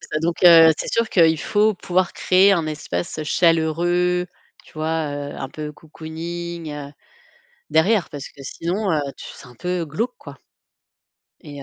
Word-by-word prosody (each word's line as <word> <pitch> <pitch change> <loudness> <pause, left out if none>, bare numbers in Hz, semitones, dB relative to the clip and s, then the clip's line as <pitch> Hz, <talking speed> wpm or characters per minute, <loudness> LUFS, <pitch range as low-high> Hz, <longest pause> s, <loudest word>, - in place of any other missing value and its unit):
C'est 155 - -4
donc 170 +1 -2
heu 165 -2 +9
c'est - - -4
sûr 230 -1 +1
qu'il 160 -3 +4
faut 210 0 +2
pouvoir 185 0 -1
créer 190 +2 +4
un 170 -4 0
espace 150 - -4
chaleureux, 175 +2 +1 0.4
tu - - -19
vois, 155 -1 -2
heu, 145 0 -5
un 135 - -5
peu 150 +2 -7
cocooning, 165 +2 -7
heu, 145 -1 -8 0.8
derrière 175 +6 +2
parce 145 -3 -7
que 140 - -14
sinon 180 +9 -3 0.3
c'est - - -11
un 125 - -16
peu 180 +4 -3
glauque, 225 +12 -3
quoi. 145 -3 -12 1.0
Et 145 -1 -10
165 Hz, 150 wpm, -21 LUFS, 150-180 Hz, 1.0 s, heu